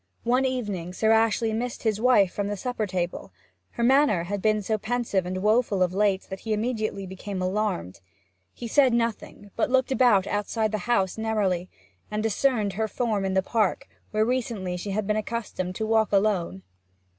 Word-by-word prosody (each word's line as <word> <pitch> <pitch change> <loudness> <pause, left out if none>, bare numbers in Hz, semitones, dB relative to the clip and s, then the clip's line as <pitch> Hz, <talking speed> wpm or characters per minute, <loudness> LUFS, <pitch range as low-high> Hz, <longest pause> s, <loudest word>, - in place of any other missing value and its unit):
One 250 +3 +2
evening 205 -9 -3
Sir 220 +4 +2
Ashley 225 0 +2
missed 240 +2 -3
his 220 -2 0
wife 220 -7 +4
from 205 -1 -2
the 205 0 -3
supper 235 0 -2
table; 180 - -3 0.4
her 235 - -2
manner 260 - +4
had 200 +3 -4
been 215 0 +2
so 215 +2 -1
pensive 215 -5 -1
and 185 +1 -3
woeful 215 -3 +3
of 180 0 -1
late 195 -1 +1
that 190 - -5
he 220 +1 -2
immediately 215 -3 -2
became 190 +1 -6
alarmed. 185 - -2 0.5
He 240 - -7
said 260 +1 +4
nothing, 230 -3 -3
but - - 0
looked 260 +1 +2
about 245 -8 +4
outside 210 +2 -1
the 215 - -1
house 195 -3 +1
narrowly, 200 -5 0 0.4
and 215 0 -2
discerned 220 -2 +1
her 220 +3 -1
form 215 -2 -1
in 190 0 -1
the 190 - +3
park, 215 -2 0 0.2
where 215 0 +1
recently 230 -7 -2
she 180 +3 -5
had 200 +1 -1
been 210 +1 0
accustomed 215 -5 -4
to 220 - -2
walk 220 0 +2
alone. 195 - +1
215 Hz, 180 wpm, -26 LUFS, 190-230 Hz, 0.5 s, wife